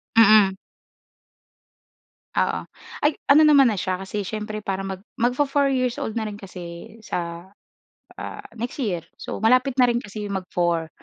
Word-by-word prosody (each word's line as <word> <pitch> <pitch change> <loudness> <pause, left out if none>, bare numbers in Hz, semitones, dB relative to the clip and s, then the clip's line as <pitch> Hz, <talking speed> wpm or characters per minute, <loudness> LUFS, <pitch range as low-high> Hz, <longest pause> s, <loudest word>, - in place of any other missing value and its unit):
Mm. 215 -3 +6 1.8
Oo, - - +1 0.5
ay 295 - +3 0.2
ano 295 +2 +8
naman 275 -5 +6
na 205 - -2
siya 185 -1 -1
kasi 200 0 -4
siyempre 215 0 -4
para 195 -2 -3
mag 190 -1 -5 0.2
magfo-4 275 +3 +2
years 255 -2 0
old - - -2
na 220 -1 -1
rin 210 - -6
kasi 180 -2 -9
sa, 170 -3 -5 0.7
ah, - - -7
next 240 +5 -5
year 180 -9 -2 0.2
so - - -5
malapit 255 +3 +4
na 255 - +6
rin 240 0 0
kasi 205 +1 -7
mag-four 175 -3 -1
215 Hz, 145 wpm, -23 LUFS, 190-245 Hz, 1.8 s, ano